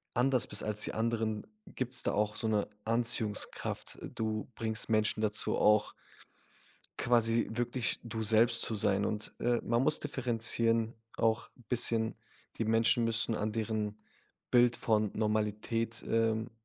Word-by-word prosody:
anders 130 0 +3
bist - - +1
als 105 0 -1
die - - +1
anderen, 110 -1 -1 0.3
gibt's 130 0 -1
da - - 0
auch 105 0 0
so - - -4
'ne 105 -2 0 0.2
Anziehungskraft. 115 -2 -1 0.2
Du 110 -1 -2
bringst 110 -1 +1
Menschen 110 -1 +1
dazu 105 -1 0
auch 105 0 +3 1.1
quasi 115 -1 +2
wirklich 120 +1 -1
du 115 -1 -4
selbst 115 +2 +4
zu 110 - -2
sein. 100 -1 +1
Und, 105 0 -3
äh, 120 0 +1
man 120 +1 +1
muss 155 +3 +3
differenzieren 115 -4 0 0.2
auch 115 -1 0 0.2
bisschen, 115 -2 +1 0.4
die 115 - -1
Menschen 115 +2 +2
müssen 115 0 +1
an 105 0 -2
deren 110 -1 -3 0.5
Bild 120 0 +4
von 110 -2 +1
Normalität, 110 +1 0
ähm, 115 0 0
115 Hz, 135 wpm, -31 LUFS, 110-115 Hz, 1.1 s, selbst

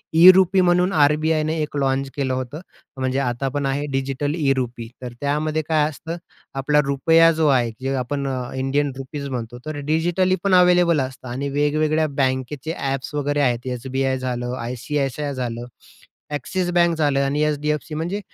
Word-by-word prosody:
ई-रुपी 185 +2 +7
म्हणून 180 +1 +3
आर-बी-आयने 155 +2 +1
एक 150 -1 -3
लॉन्च 135 0 0
केलं 135 -2 -1
होतं, 130 +4 -4 0.4
म्हणजे 130 0 -1
आता 125 0 -1
पण 140 +1 -2
आहे. 140 +2 -1
डिजिटल 135 +2 -1
ई-रुपी 130 -6 -1
तर 125 -1 -6
त्यामध्ये 150 +2 0
काय 155 -2 +3
असतं, 165 +3 -7 0.4
आपला 150 +2 +2
रुपया 165 +4 +4
जो 160 -1 +1
आहे 125 -5 +3
जे 135 +1 -1
आपण 140 +2 -3 0.3
इंडियन 135 +2 0
रुपीज 140 +1 -6
म्हणतो 120 -1 -5
तर 155 -1 -4
डिजिटली 175 +3 +2
पण 200 -1 +2
अवेलेबल 180 -3 +5
असतं 130 0 -6
आणि 135 +3 -3
वेगवेगळ्या 155 +2 +1
बँकेचे 130 +4 -2 0.2
एप्स 135 +2 -5
वगैरे 145 0 0
आहेत 125 -2 0
एस-बी-आय 130 +2 -1
झालं, 125 -1 -3
आय-सी-आय-सी-आय 135 +4 -3
झालं, 120 -2 -4 0.7
ॲक्सिस 175 +6 -2
बँक 175 -1 +4
झालं 145 -3 +2
आणि 145 +2 0
एच-डी-एफ-सी 150 +1 -1
म्हणजे 170 +6 -2
145 Hz, 155 wpm, -22 LUFS, 130-155 Hz, 0.7 s, ई-रुपी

